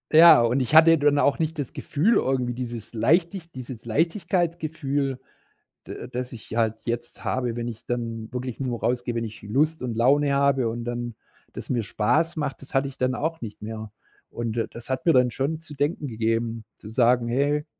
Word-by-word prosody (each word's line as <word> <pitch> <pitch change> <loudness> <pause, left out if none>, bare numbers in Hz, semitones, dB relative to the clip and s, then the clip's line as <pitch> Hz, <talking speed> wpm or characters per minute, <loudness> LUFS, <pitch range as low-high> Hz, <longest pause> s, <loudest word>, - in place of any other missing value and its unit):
Ja, 165 -5 +9
und 120 +3 +2
ich 130 +4 0
hatte 165 +1 +8
dann 145 -1 +3
auch 140 - +2
nicht 160 0 -1
das 145 -4 -3
Gefühl 185 +11 +1
irgendwie, 125 -2 +1
dieses 120 -3 -6
Leichtig 165 - +1
dieses 125 -2 -8
Leichtigkeitsgefühl, 155 - -1 0.7
da - - -7
das 125 0 -5
ich 110 -2 -10
halt 110 -1 0
jetzt 120 0 -4
habe, 125 -3 -1
wenn 120 0 -3
ich 115 -1 -10
dann 115 -2 -4
wirklich 125 -1 -4
nur 125 -4 -3
rausgehe, 120 -1 -1
wenn 115 - -1
ich 110 -1 -8
Lust 150 +10 0
und 125 -3 -3
Laune 140 +5 +3
habe 140 -3 +3
und 120 +1 -4
dann 120 -1 -4 0.4
das - - -8
mir 120 -3 0
Spaß 160 +12 +1
macht. 145 -4 -3
Das 135 - -12
hatte 135 +1 +1
ich 135 - -14
dann 130 0 0
auch 160 +3 -2
nicht 110 -3 -8
mehr. 110 0 -6 0.4
Und 115 -1 -4
da 115 - 0
das 120 +2 -12
hat 130 0 -2
mir 165 - +5
dann 125 -2 +4
schon 145 +7 -2
zu 155 -2 -11
denken 145 +1 -1
gegeben, 115 -1 -1
zu 105 - -11
sagen: 120 +1 +3
„Hey, 145 +4 +1
125 Hz, 195 wpm, -25 LUFS, 115-145 Hz, 0.7 s, Ja